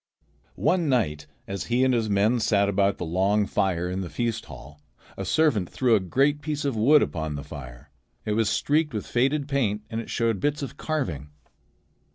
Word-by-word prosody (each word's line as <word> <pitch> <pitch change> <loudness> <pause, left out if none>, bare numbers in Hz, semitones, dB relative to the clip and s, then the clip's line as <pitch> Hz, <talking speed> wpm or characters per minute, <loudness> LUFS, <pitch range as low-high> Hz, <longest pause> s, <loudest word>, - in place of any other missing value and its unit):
One 175 -5 +1
night 75 - 0 0.2
as 95 -2 -4
he 120 +2 +1
and 130 -1 +3
his 115 -3 0
men 105 +4 +2
sat 100 -3 +2
about 100 0 +1
the 90 - -4
long 95 +5 +1
fire 90 -3 0
in 90 +1 -3
the 90 - -5
feast 115 +7 -2
hall, 75 +2 -12 0.3
a 95 - -5
servant 110 - +2
threw 125 -3 +1
a 110 - +5
great 140 - +1
piece 150 -1 -3
of 140 -4 0
wood 140 +8 +5
upon 80 -2 -3
the 70 - -5
fire. 65 -5 -10 0.3
It 105 - -1
was 110 -1 +1
streaked 150 0 +1
with 105 - -3
faded 135 +4 0
paint 110 -8 0
and 115 +1 -2
it - - -11
showed 115 -4 0
bits 145 +3 -1
of 140 - -6
carving. 90 - -3
110 Hz, 195 wpm, -25 LUFS, 95-135 Hz, 0.3 s, a